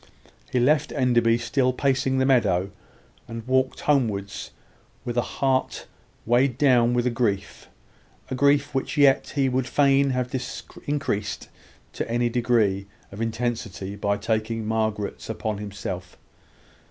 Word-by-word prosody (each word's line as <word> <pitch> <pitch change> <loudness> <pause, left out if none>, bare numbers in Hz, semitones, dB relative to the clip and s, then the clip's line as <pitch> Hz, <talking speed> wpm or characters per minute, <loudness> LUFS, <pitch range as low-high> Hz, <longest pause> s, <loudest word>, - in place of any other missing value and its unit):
He 125 - +2
left 145 +4 +2
Enderby 120 -4 +3
still 130 +2 +1
pacing 130 0 +1
the 130 - +2
meadow, 100 -8 +2 0.6
and 115 0 -7
walked 130 0 +1
homewards 105 -9 0 0.6
with 120 - -3
a 120 - +3
heart 130 +1 -1 0.4
weighed 120 +2 +2
down 125 -4 +4
with 120 0 +1
grief 105 -5 -2 0.6
a - - 0
grief 140 +2 +2
which 135 +3 -2
yet 140 -2 +4
he 140 -2 +2
would 130 0 0
fain 140 -1 +3
have 125 -1 -2 0.5
increased 140 -9 -2 0.4
to - - -4
any 120 +1 +1
degree 115 -5 +1 0.2
of 100 +3 -7
intensity 115 -4 -3
by 100 0 0
taking 110 0 -2
Margaret's 110 -2 -2
upon 110 -2 -3
himself. 95 -3 -6
120 Hz, 130 wpm, -24 LUFS, 110-130 Hz, 0.6 s, down